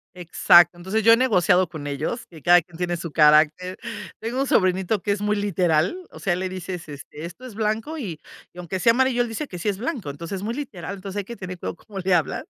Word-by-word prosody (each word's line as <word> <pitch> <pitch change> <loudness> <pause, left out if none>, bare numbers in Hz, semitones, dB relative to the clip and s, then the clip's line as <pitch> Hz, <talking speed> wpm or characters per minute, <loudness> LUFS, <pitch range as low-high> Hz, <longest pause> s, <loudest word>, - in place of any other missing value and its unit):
Exacto, 175 0 +5
entonces 190 +5 -2
yo 230 +2 +8
he 230 - +5
negociado 185 -7 +3
con 155 -4 -8
ellos, 150 - -3
que 160 -3 -15
cada 175 +2 +6
quien 170 0 -15
tiene 175 -1 -1
su 165 -2 -6
carácter, 155 +4 +4 0.4
tengo 240 +4 -2
un 275 - 0
sobrinito 185 +2 +2
que 205 - 0
es 200 0 -1
muy 210 0 +1
literal, 180 - +1
o - - -12
sea, 175 -3 0
le 185 0 -3
dices: 180 -2 -6
"Este, 145 +2 -9
esto 210 +9 -10
es 250 - -9
blanco 220 +8 -2
y 175 - -5 0.3
y - - -21
aunque 180 +2 -4
sea 230 - +5
amarillo, 260 -1 +2
él 240 - 0
dice 255 +6 -4
que 180 - -8
sí 210 - -1
es 195 - -2
blanco", 235 - -4
entonces, 170 +6 -6
muy 225 +4 -3
literal, 200 - -6
entonces 195 +1 -7
hay 200 - -4
que 235 +3 -8
tener 185 -3 -7
cuidado - - -4
cómo 195 +2 -9
le 190 0 +1
hablan, 165 - -1
185 Hz, 240 wpm, -23 LUFS, 175-220 Hz, 0.4 s, yo